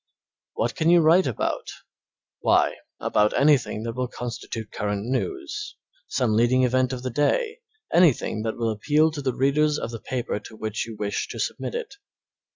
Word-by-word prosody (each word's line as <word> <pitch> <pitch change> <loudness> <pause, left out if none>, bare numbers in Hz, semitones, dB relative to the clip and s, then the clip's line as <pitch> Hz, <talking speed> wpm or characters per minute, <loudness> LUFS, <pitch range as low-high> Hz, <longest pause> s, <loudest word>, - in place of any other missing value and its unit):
What 115 +1 -1
can 165 -2 +1
you 175 0 +7
write 165 +3 +5
about? 120 - -2 0.7
Why - - +3 0.2
about 105 0 +2
anything 140 -7 +3
that 115 0 -3
will 125 +1 -2
constitute 115 -2 -6
current 105 0 -2
news, 365 - -3 0.3
some 125 -5 0
leading 120 +4 +3
event 130 +1 +2
of 130 -1 -5
the 130 - -2
day, 445 - +1 0.3
anything 150 -10 +3
that 110 0 -3
will 115 -1 0
appeal 150 +9 +2
to 150 -2 -5
the 130 -3 -1
readers 150 +3 +2
of 115 - -4
the 115 - -6
paper 120 -4 -3
to 110 - -12
which 110 +1 -3
you 115 - -7
wish 105 -1 -2
to - - -7
submit - - -3
it. 460 -4 -5
130 Hz, 170 wpm, -25 LUFS, 115-155 Hz, 0.7 s, you